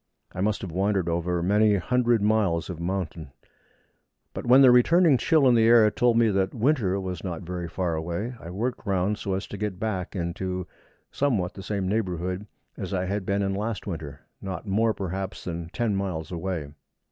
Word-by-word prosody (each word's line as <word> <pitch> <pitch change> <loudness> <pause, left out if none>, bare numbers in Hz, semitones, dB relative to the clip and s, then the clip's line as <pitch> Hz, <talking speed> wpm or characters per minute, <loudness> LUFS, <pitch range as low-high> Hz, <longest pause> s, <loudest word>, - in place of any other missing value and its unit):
I 90 - -4
must 105 +1 0
have 95 - -5
wandered 95 +1 0
over 85 +1 -1
many 105 +3 +4
hundred 120 +2 +1
miles 100 -6 +1
of 85 - -7
mountain, 85 -5 -4 1.0
but - - -6
when 130 +3 +7
the 130 - +8
returning 160 +5 +5
chill 150 +2 +4
in 125 - +5
the 115 -1 +4
air 115 -2 +6
told 120 +1 +2
me 115 -1 +4
that 95 -1 0
winter 115 -6 +1
was 95 -1 -5
not 90 -3 -4
very 90 0 -4
far 85 0 -2
away, 85 +9 -3
I 85 - -9
worked 115 +8 -3
round 100 +2 0
so 95 -1 -2
as 95 - -3
to 105 - -8
get 105 -4 -3
back 100 -3 -3
into 90 +1 -3 0.5
somewhat 110 -10 0
the 95 - -9
same 100 -1 -2
neighbourhood 95 -1 -2 0.3
as - - -4
I 90 0 -1
had 100 0 -3
been 100 0 +1
in 95 0 0
last 105 +2 -3
winter, 75 -7 -6 0.2
not 95 -1 -5
more, 110 +2 +1
perhaps, 95 0 -4
than 85 -1 -5
ten 115 0 -1
miles 95 -5 -3
away. 85 -4 -3
95 Hz, 190 wpm, -26 LUFS, 90-110 Hz, 1.0 s, the